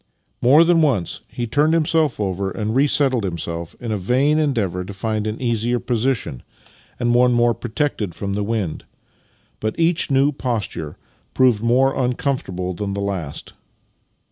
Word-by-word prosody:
" - - -46
More 155 +4 +8
than 170 -1 +4
once 125 - 0
he 120 - -4
turned 150 +7 +2
himself 160 -4 +1
over 95 -1 -1
and 110 +2 -3
resettled 135 -3 +3
himself, 85 -2 -4
in 120 -2 -5
a 105 - 0
vain 130 +10 +2
endeavour 105 - 0
to 100 - -8
find 110 +1 -2
an 110 +1 -4
easier 120 0 0
position 120 - -1 0.6
and 120 -1 +1
one 125 0 +4
more 120 0 +3
protected 115 - -3
from 100 +3 -4
the 105 - -1
wind, 100 -6 -3 0.7
but 110 +8 -3
each 165 0 +2
new 135 +1 +3
posture 110 - -4 0.4
proved 125 -5 +4
more 130 +3 +3
uncomfortable 125 -8 -2
than 100 +3 -4
the - - -3
last. 95 -7 -4
120 Hz, 155 wpm, -21 LUFS, 100-135 Hz, 0.7 s, More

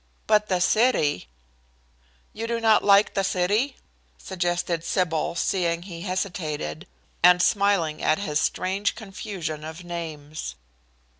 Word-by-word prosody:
But 210 0 +3
the 185 -2 +1
city" 180 - +2 1.1
"You 225 +1 -4
do 235 0 -1
not 220 -1 +4
like 200 +1 +5
the 195 - 0
city?" 205 +9 +1 0.4
suggested 175 -2 -2
Sybil, 170 -2 0
seeing 170 -1 0
he 170 -3 -8
hesitated, 175 - -3 0.3
and 180 +1 +7
smiling 195 -5 +2
at 155 - +2
his 150 -7 -1
strange 195 +2 -1
confusion 190 -7 -6
of 160 +3 -8
names. 155 - -6
180 Hz, 120 wpm, -25 LUFS, 165-200 Hz, 1.1 s, and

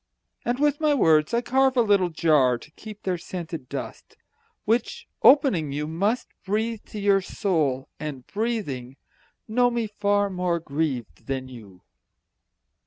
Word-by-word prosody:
And 240 +1 0
with 290 0 +2
my 300 -2 +3
words 155 - +4
I 235 - +2
carve 265 +1 +2
a - - +6
little 200 -4 +3
jar 150 -7 +3
To 150 - -15
keep 210 +4 -11
their 180 -2 -1
scented 165 -6 -7
dust, - - -7 0.5
Which, 230 +3 -1
opening, 255 - +5
you 150 +2 -2
must 200 +10 -1
Breathe 220 +3 -1
to 210 - -7
your 200 -1 +3
soul, 155 -10 -1
and, 145 -4 -6
breathing, 190 - -3 0.5
know 245 +2 +3
me 235 -1 -1
far 205 -1 0
More 180 -2 0
grieved 145 -6 -3
than 130 -1 -3
you. 105 -7 -13
185 Hz, 145 wpm, -25 LUFS, 150-225 Hz, 0.5 s, a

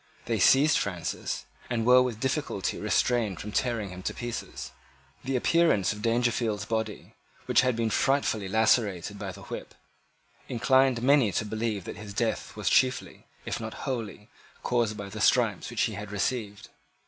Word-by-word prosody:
They 115 -2 -1
seized 140 +10 +5
Francis, 90 -4 -3 0.2
and 115 -2 -1
were 125 +1 +7
with 125 -4 -2
difficulty 130 - -2
restrained 115 -7 +1
from 105 - -6
tearing 115 -4 -1
him 90 0 -8
to - - -3
pieces. 120 -1 -6 0.5
The 130 +1 -2
appearance 145 - +3
of 105 - -9
Dangerfield's 115 -3 0
body, 110 -2 -3 0.3
which - - +4
had 125 -2 +1
been 115 -1 0
frightfully 115 -8 +1
lacerated 110 -4 +1
by - - -4
the - - -12
whip, - - -8 0.7
inclined 130 0 +3
many 135 -5 +4
to 110 - 0
believe 110 -2 -2
that - - -7
his 105 -2 -9
death 115 0 -2
was - - -5
chiefly, 130 -1 +1 0.2
if - - -3
not 110 0 -6
wholly, 110 -5 -4 0.4
caused 115 -3 0
by 100 -2 -6
the 105 +2 -7
stripes 110 -5 +2
which 120 -1 0
he 110 - 0
had 105 +1 -7
received. 105 0 -3
115 Hz, 160 wpm, -28 LUFS, 105-125 Hz, 0.7 s, were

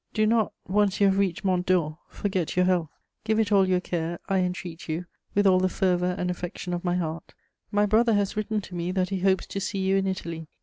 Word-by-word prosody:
Do 215 -1 +3
not, 220 -1 +2 0.2
once 205 +1 +2
you 200 - +5
have 195 0 +3
reached 195 -2 0
Mont 180 -2 +2
Dore, 170 -4 +1
forget 190 -5 -2
your 180 0 +4
health; 180 -4 +1 0.3
give 220 0 +1
it 220 -1 +1
all 195 -2 +4
your 180 -1 +3
care, 170 -1 -3
I 195 -1 +2
entreat 180 -2 -4
you, 165 +3 -2 0.3
with 205 0 +3
all 185 -1 +6
the 185 0 +2
fervour 180 -1 +1
and 180 0 -1
affection 180 0 -5
of 175 - -3
my 175 -1 +1
heart. 165 -2 -4 0.4
My 205 0 +3
brother 220 +2 +3
has 200 -1 0
written 215 0 -1
to 190 - -12
me 175 0 -2
that 185 -1 0
he 195 -1 -2
hopes 190 0 +2
to 195 - -5
see 200 - -3
you 190 0 +2
in 195 0 0
Italy. 165 -4 -4
185 Hz, 235 wpm, -26 LUFS, 175-200 Hz, 0.4 s, all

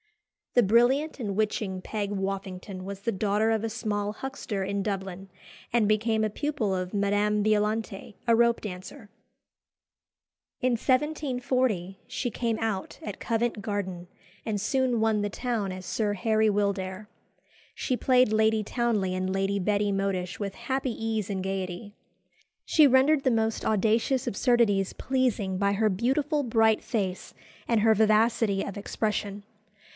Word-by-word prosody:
The 245 - +6
brilliant 245 +9 +3
and 205 -5 -3
witching 210 -3 -1
Peg 205 0 -3
Woffington 195 -1 -4
was 195 +1 -7
the 230 - -1
daughter 210 +2 +1
of 220 -1 0
a 225 - -1
small 210 -2 -2
huckster 230 -5 -4
in 200 +1 -2
Dublin, 195 -2 -4 0.4
and 230 -3 +3
became 220 +1 +2
a - - 0
pupil 225 -5 -1
of 185 +1 -4
Madame 205 +1 +1
Violante, 210 -1 -1
a 230 - +5
rope 235 0 +3
dancer. 205 +4 -8 1.5
In 255 - +1
1740 255 - 0
she 245 - -3
came 230 -1 -1
out 215 -4 -3
at 205 - -6
Covent 230 -1 -1
Garden, 190 -4 -4 0.4
and 215 -2 -1
soon 250 +2 +1
won 220 -1 +2
the 205 - -1
town 220 -3 -2
as 185 0 -7
Sir 210 +1 -1
Harry 220 +2 +2
Wildair. 200 -1 -1 0.7
She 255 - -1
played 250 -3 +3
Lady 220 0 +3
Townley 215 -5 0
and 185 0 -1
Lady 195 +1 0
Betty 205 +1 +1
Modish 195 -2 -1
with 200 -2 -4
"happy 260 +2 -2
ease 225 -2 -2
and 190 -2 -2
gaiety." 190 +1 -4 0.7
She 310 -3 +6
rendered 275 +3 +4
the 260 - +3
most 225 -1 0
audacious 225 +5 +1
absurdities 205 -4 +2
pleasing 240 -8 0
by 200 +1 +2
her 215 +2 +2
beautiful 275 - 0
bright 225 -3 +3
face 195 -6 -3 0.3
and 230 -2 +3
her 220 +1 +5
vivacity 215 -1 +3
of 200 - -6
expression. 205 -1 -2
215 Hz, 145 wpm, -27 LUFS, 195-235 Hz, 1.5 s, The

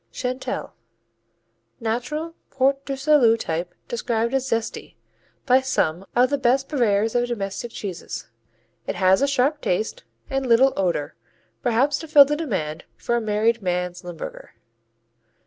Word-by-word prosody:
Chantelle 255 0 -4 1.1
U.S.A. - - -16
Natural 300 +9 -2 0.2
Port 275 +1 +1
du 275 - -2
Salut 265 -5 +4
type 165 -1 -3
described 235 0 -1
as 265 0 0
"zesty" 230 0 -3 0.5
by 260 -1 +5
some 190 -8 -1
of 250 +2 +4
the 285 - +1
best 265 +2 +2
purveyors 220 -6 +1
of 245 0 +1
domestic 200 -1 -4
cheeses. 195 -6 -6 0.6
It - - -2
has 190 0 +4
a 280 - +3
sharp 280 +2 +1
taste 220 - -1 0.2
and 270 -1 -2
little 255 +3 +5
odor, 170 -5 -1 0.5
perhaps 255 +4 +2
to 320 - -8
fill 295 -2 +8
the 295 +2 -1
demand 185 - -3
for 235 - -1
a 235 - +1
"married 220 +2 +1
man's 180 -1 -2
Limburger." 175 -2 -8
240 Hz, 145 wpm, -23 LUFS, 200-270 Hz, 1.1 s, fill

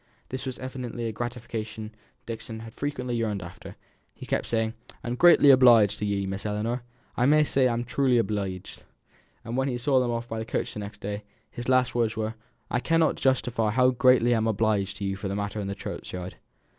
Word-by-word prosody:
This 130 +1 -5
was 130 - -4
evidently 125 -2 -5
a 115 - -1
gratification 110 -1 -5 0.3
Dixon 115 -1 -6
had 115 0 -10
frequently 125 -4 -3
yearned 105 -5 -1
after; 85 +2 -10 0.4
he - - -9
kept - - -1
saying, 110 -1 0 0.3
"I'm 120 - -2
greatly 145 0 +7
obleeged 120 -6 +6
to 105 - -1
ye, 100 -1 0
Miss 95 +1 -4
Ellinor. 110 +4 -2 0.3
I 125 - +2
may 150 +1 +5
say 135 -3 +2
I'm 120 0 -1
truly 125 0 +2
obleeged." 100 -4 -2 0.6
And 115 +1 -4
when 135 +1 +1
he 125 -2 -1
saw 130 +2 +2
them 125 -1 0
off 120 0 -2
by 115 -1 -4
the - - -2
coach - - -2
the - - -6
next 105 0 -8
day, 100 +1 -4 0.3
his 120 +1 -6
last 130 -1 +3
words 115 -2 0
were, 110 0 -2 0.4
"I 125 - +1
cannot 165 +4 +2
justly 130 -2 +1
say 110 -2 +2
how 130 +1 +4
greatly 125 -1 +4
I'm 110 -1 +1
obleeged 105 -2 0
to - - -6
you 95 0 -1
for 100 +1 -5
that 95 - -3
matter 100 +1 -3
of 100 - -3
the 100 - -3
churchyard." 90 -2 -7
115 Hz, 205 wpm, -26 LUFS, 105-125 Hz, 0.6 s, greatly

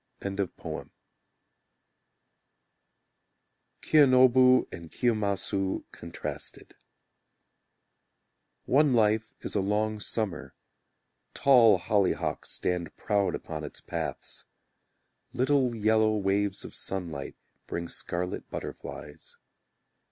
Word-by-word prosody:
Kiyonobu 130 -3 +6
and 85 -2 -9
Kiyomasu 100 -4 0
Contrasted 85 - -7 1.9
One 140 0 +4
life 110 -1 +2
is - - -5
a 100 - +2
long 105 +2 0
summer; 105 -3 -3 0.8
Tall 120 -7 +6
hollyhocks 100 +1 0
stand 90 -3 -2
proud 100 -2 0
upon 80 -1 -6
its 75 - -7
paths; 80 -5 -6 0.9
Little 130 -1 +2
yellow 110 0 +3
waves 100 0 0
of - - -9
sunlight, 85 -7 -4 0.3
Bring 85 0 -4
scarlet 90 +2 -4
butterflies. 75 0 -8
105 Hz, 75 wpm, -28 LUFS, 90-120 Hz, 1.9 s, Kiyonobu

